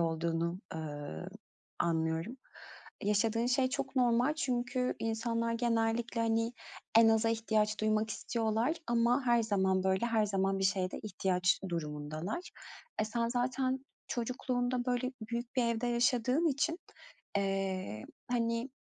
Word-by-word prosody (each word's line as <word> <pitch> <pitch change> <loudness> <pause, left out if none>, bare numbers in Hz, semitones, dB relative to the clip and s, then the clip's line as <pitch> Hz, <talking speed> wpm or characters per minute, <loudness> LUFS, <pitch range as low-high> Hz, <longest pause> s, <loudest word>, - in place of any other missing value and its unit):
olduğunu, 165 +1 0 0.2
eee, 145 - -5 0.5
anlıyorum. 165 +7 0 0.7
Yaşadığın 225 +3 +2
şey 255 +1 +3
çok 265 0 -4
normal 245 +4 +3
çünkü 250 -3 0
insanlar 230 +1 -1
genellikle, 230 0 0
hani, 230 +1 +1 0.5
en 225 -1 +8
aza 225 0 +4
ihtiyaç 220 -2 +1
duymak 215 0 +1
istiyorlar 230 +7 0
ama 240 +3 +2
her 235 -1 +4
zaman, 190 -3 +1
böyle, 190 +5 +2
her 220 -2 +2
zaman 195 -1 +1
bir 195 - 0
şeye 190 -1 +1
de - - -5
ihtiyaç 185 -3 +1
durumundalar. 155 - -4 0.5
E, 215 - +2
sen 230 +1 -1
zaten 255 +2 0 0.2
çocukluğunda, 245 0 -1
böyle, 250 +1 0 0.2
büyük 235 +2 -4
bir 250 - +4
evde 235 +1 0
yaşadığın 250 +5 +2
için, 305 +4 0 0.6
eee, 190 - -1 0.3
hani, 230 +1 0
230 Hz, 125 wpm, -33 LUFS, 195-245 Hz, 0.7 s, en